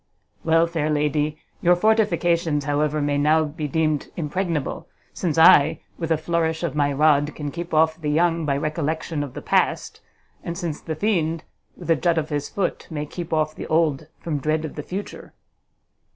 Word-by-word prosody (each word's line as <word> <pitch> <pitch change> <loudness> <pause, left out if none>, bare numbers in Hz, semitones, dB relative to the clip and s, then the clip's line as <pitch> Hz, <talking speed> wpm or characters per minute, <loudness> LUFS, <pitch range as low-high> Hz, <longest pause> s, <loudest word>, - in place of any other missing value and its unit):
_ - - -47 0.4
Well, 165 0 +4
fair 165 -3 -2
lady, 150 0 0 0.2
your 175 +1 +5
fortifications, 175 -7 +2
however, 150 +1 0
may 145 0 0
now 155 +2 +4
be 150 0 -4
deemed 155 0 0
impregnable, 165 -1 -2 0.3
since 165 -4 -2
I, 160 -1 +6 0.2
with 165 -2 -3
a 160 - +4
flourish 160 0 -1
of 165 -5 -1
my 145 -1 +1
rod, 145 +1 +3
can 145 -2 -5
keep 170 +2 -6
off 160 +1 +2
the 150 - -2
young 165 +2 +2
by 140 -2 0
recollection 155 +1 -2
of 140 -3 -6
the - - -7
past, - - 0 0.4
and 170 0 -5
since 170 -5 -4
the 160 - -4
fiend, 165 -4 0 0.3
with - - -3
a - - +6
jut 170 +1 +1
of 155 -1 -1
his 145 -1 -2
foot, 195 -3 -2
may 150 -3 -4
keep 170 +3 -7
off 155 -1 +1
the - - -7
old 155 -2 +1
from 155 -4 -3
dread 155 +3 0
of 155 - -6
the 150 - -5
future!" 190 +7 -7
155 Hz, 185 wpm, -23 LUFS, 150-170 Hz, 0.4 s, I